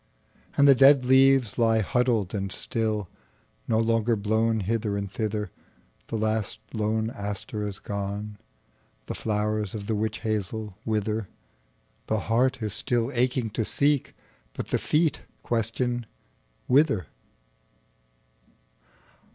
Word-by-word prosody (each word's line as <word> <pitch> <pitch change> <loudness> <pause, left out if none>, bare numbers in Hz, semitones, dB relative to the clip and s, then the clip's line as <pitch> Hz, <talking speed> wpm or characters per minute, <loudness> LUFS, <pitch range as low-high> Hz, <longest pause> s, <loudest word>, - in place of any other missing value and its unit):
And 140 - +6
the 140 - +9
dead 135 0 +6
leaves 130 -3 +4
lie 115 -1 +4
huddled 115 -3 +1
and 100 -2 -2
still, 110 -1 -2 0.6
No 110 - +2
longer 115 0 +2
blown 110 +2 +1
hither 105 0 -1
and 100 -1 -4
thither; 105 -1 -2 0.6
The - - -4
last 110 -1 -1 0.2
lone 110 0 0
aster 105 -2 -5
is 100 -2 -6
gone; 100 +1 -5 0.7
The - - -4
flowers 105 -1 -1
of 100 -2 -5
the 110 - -1
witch 105 0 -2
hazel 110 -2 -3
wither; 110 -1 -1 0.8
The 110 -2 0
heart 120 +2 +1
is 105 -2 -2
still 120 0 0
aching 125 -2 0
to 115 - -1
seek, 140 +4 +1 0.4
But - - -5
the - - +1
feet 155 0 +1 0.2
question 120 +1 -1 0.6
'Whither? 130 - +3
110 Hz, 120 wpm, -26 LUFS, 105-120 Hz, 0.8 s, the